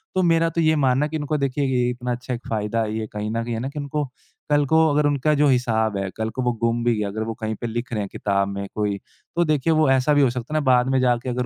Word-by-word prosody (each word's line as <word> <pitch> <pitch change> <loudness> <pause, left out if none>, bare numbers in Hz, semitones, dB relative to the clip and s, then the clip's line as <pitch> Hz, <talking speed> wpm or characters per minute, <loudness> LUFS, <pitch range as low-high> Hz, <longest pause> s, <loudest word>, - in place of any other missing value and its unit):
तो 185 - +2
मेरा 165 -1 +3
तो 165 +1 -1
ये 160 0 +3
मानना 135 -1 +2
है, - - -4
कि 160 - -2
उनको 150 0 -1
देखिए 140 0 -1
ये 125 -2 +1
इतना 125 0 -3
अच्छा 125 +1 -4
एक 120 - -7
फ़ायदा 110 +1 -1
है 110 0 -3
ये 110 -1 -3
कहीं 105 0 -3
न 115 +1 -1
कहीं। 120 0 -4
है 115 - -2
ना? 130 +3 -3
कि 150 - -6
उनको 145 +1 -2 0.4
कल 145 -1 +3
को 160 +3 +4
अगर 150 +1 +2
उनका 145 +1 +1
जो 145 0 +3
हिसाब 110 -5 +1
है, 100 -1 -2
कल 110 0 -1
को 130 - -4
वो 125 - +2
गुम 115 0 +1
भी 120 -1 +2
गया, 105 -1 -1
अगर 110 +2 -3
वो 115 0 -3
कहीं 110 -1 -4
पे 120 - -2
लिख 120 +3 -4
रहे 105 - -1
हैं 100 - -4
किताब 100 -1 0
में 100 0 -4
कोई। 105 -2 -1 0.4
तो 175 - +3
देखिए, 155 0 +2
वो 155 -3 +3
ऐसा 135 +3 +3
भी 145 - +4
हो 135 - +4
सकता 125 +3 -5
है 155 - +2
ना - - -1
बाद 125 -1 +4
में 135 0 +2
जाके 125 0 +1
अगर 125 0 -1
125 Hz, 310 wpm, -23 LUFS, 110-145 Hz, 0.4 s, को